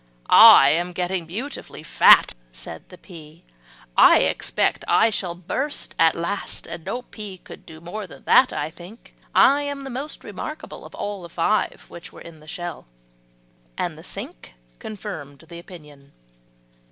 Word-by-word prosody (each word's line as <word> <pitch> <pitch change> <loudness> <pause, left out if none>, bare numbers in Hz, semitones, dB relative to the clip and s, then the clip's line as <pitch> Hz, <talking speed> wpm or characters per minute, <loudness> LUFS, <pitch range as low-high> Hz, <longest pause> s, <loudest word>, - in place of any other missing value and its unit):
"I 135 - +9
am 175 +3 -1
getting 180 -1 -3
beautifully 240 - -7
fat," - - +6 0.2
said 80 +6 -9
the 180 - -13
pea, 165 -3 -14 0.5
"I - - +7
expect - - -1
I 225 - +3
shall 180 -4 -4
burst 260 - -4
at 165 -1 +4
last; 170 +5 -5 0.2
no 245 +8 -5
pea 210 -5 -10
could - - -14
do 160 -1 -12
more 190 +5 -7
that - - -15
that, 255 - +5
I 150 +2 -4
think; 180 +8 -15 0.2
I 285 +1 +5
am 285 -1 -5
the 270 - -7
most 275 +5 -7
remarkable - - -8
of - - -12
all 205 -2 -5
the 170 - -10
five 175 +6 -1
which 170 - -12
were - - -14
in 165 -2 -13
the 155 - -18
shell." 175 - -7 0.9
And - - -3
the - - -14
sink - - -10 0.2
confirmed 165 -9 -9
the 170 -1 -9
opinion. 150 -6 -15
175 Hz, 155 wpm, -22 LUFS, 160-215 Hz, 0.9 s, I